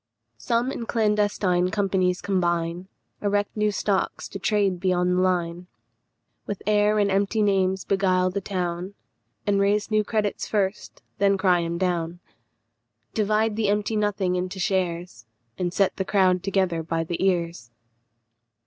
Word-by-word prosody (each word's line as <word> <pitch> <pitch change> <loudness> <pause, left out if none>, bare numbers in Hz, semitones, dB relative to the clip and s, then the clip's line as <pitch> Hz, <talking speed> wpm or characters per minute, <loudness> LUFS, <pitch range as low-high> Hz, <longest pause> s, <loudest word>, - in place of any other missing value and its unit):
Some 240 +2 0
in 230 - -5
clandestine 205 -5 +1
companies 185 -2 0
combine; 175 -2 -1 0.3
Erect 205 0 0
new 210 -1 +2
stocks 200 -1 -1
to 195 - -7
trade 200 -2 +1
beyond 180 -1 +1
the 180 - +2
line; 175 -1 -1 0.8
With 205 - -5
air 210 0 +3
and 200 -1 +2
empty 200 +3 +1
names 190 -2 +1
beguile 185 -2 +2
the 200 +2 -3
town, 180 0 -3 0.5
And 200 -1 +2
raise 205 +2 +1
new 215 0 +3
credits 210 -1 -1
first, 200 -1 -2 0.2
then 200 0 +3
cry 185 -2 +3
'em 170 0 -2
down; 175 -2 -1 0.9
Divide 215 0 +1
the 215 -2 0
empty 210 +2 0
nothing 205 -3 0
into 185 +1 -3
shares, 175 - -2 0.3
And 180 -1 -1
set 195 +1 +1
the 190 - 0
crowd 185 -2 +2
together 185 -4 0
by 165 0 -2
the 170 +2 -3
ears. 170 -9 0
190 Hz, 140 wpm, -24 LUFS, 180-205 Hz, 0.9 s, air